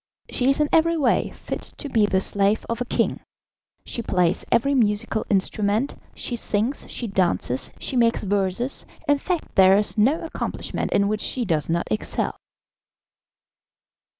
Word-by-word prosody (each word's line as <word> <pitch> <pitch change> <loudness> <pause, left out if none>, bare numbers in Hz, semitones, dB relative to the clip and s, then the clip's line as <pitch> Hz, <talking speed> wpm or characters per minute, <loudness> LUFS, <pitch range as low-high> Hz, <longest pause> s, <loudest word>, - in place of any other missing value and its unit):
She 255 +1 +1
is 275 - +2
in 300 - +3
every 330 +1 +4
way 270 -6 +2
fit - - -6 0.2
to - - -5
be 220 -6 +2
the 190 -2 +1
slave 200 +2 +1
of 230 +1 -3
a - - 0
king; - - 0 0.7
she 235 - -2
plays 180 -5 +1
every 245 +5 +3
musical 215 -3 0
instrument, 205 +5 +1 0.2
she 245 - -3
sings, 225 +3 -1
she 240 - -4
dances, 175 - 0
she - - -2
makes 230 -2 +2
verses, 200 +5 -1 0.2
in 290 -1 +3
fact 355 +2 -3
there 190 0 +6
is 210 +1 +1
no 280 +11 +3
accomplishment 325 - -4
in 200 0 +2
which 210 0 -1
she 250 -2 0
does 160 -6 0
not 170 +1 0
excel." 110 - -1
215 Hz, 155 wpm, -23 LUFS, 195-255 Hz, 0.7 s, there